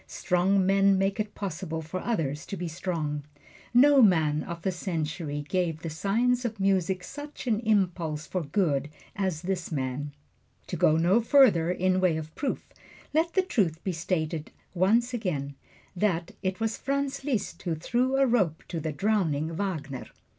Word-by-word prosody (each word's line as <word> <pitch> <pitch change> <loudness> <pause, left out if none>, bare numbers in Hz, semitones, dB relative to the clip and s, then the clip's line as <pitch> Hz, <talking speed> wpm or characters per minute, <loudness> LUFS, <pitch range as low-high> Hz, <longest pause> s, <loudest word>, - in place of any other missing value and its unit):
Strong 185 +2 +1
men 195 0 +4
make 195 +2 0
it 210 0 -3
possible 165 -4 -4
for 160 +4 -4
others 160 - -2
to 195 - -5
be 175 0 -3
strong. 160 -4 -3 0.5
No 275 +3 +7
man 160 -8 +4
of 170 -2 -7
the 190 - +1
century 160 -4 -3
gave 170 -3 -1
the 165 - -3
science 235 +9 +1
of 225 -3 -3
music 190 -1 +1
such 290 +7 -8
an 220 -4 +1
impulse 180 -8 0
for 185 +4 -2
good 145 -3 0 0.3
as 190 -6 -2
this 180 -2 -2
man. 140 0 -2 0.5
To - - -4
go 160 -2 +4
no 180 +8 +4
further 225 - +5
in 185 +1 +1
way 175 -4 +3
of 155 0 -7
proof, 280 - -3 0.5
let 325 +2 +2
the 380 - +3
truth 180 - 0
be 190 - -1
stated 165 -2 -2
yet - - -31 0.2
once 225 +7 +2
again, 155 - -2 0.4
that 175 -3 0
it 185 +1 -2
was 225 0 -1
Franz 275 0 -2
Liszt 250 -8 -2
who 170 -3 -1
threw 245 - 0
a 275 - +5
rope 195 - +1
to 170 - -3
the 155 0 -3
drowning 165 -4 0
Wagner. 160 -8 -4
185 Hz, 170 wpm, -28 LUFS, 160-215 Hz, 0.5 s, No